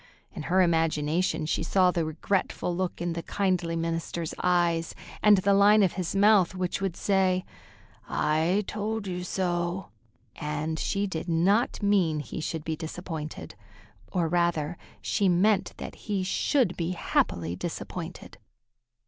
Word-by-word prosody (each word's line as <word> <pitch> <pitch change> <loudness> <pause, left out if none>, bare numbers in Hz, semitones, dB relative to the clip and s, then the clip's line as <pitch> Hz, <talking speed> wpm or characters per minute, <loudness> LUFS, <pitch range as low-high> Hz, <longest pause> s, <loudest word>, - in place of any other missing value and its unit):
In - - -7
her 185 +1 +5
imagination 160 0 +1
she 155 - -1
saw 180 +2 +3
the 170 -2 0
regretful 175 +2 -1
look 185 0 -2
in 175 -1 -1
the 170 - -4
kindly 180 -3 0
minister's 165 0 -3
eyes, 170 -2 +1 0.3
and 210 -1 +7
the 200 +2 +3
line 205 +1 +6
of 185 - +2
his 185 0 -3
mouth 200 -3 +5
which 185 +1 -2
would 190 -3 -1
say, 190 -2 +2 0.6
"I 165 +7 +1
told 215 +1 -3
you 180 -1 -4
so," 175 0 -2 0.4
and 150 +2 -3
she 200 +1 0
did 175 -2 -4
not 195 +8 +2
mean 185 -7 +2
he 150 - -6
should 160 0 -3
be 160 0 -2
disappointed. 160 -1 -6 0.6
Or, 170 -2 +1
rather, 170 -1 0 0.3
she 200 -3 +2
meant 190 +3 +2
that - - -7
he 200 -3 -3
should 200 - +1
be 170 +1 -2
happily 85 - 0
disappointed. - - -6
175 Hz, 140 wpm, -27 LUFS, 165-195 Hz, 0.6 s, and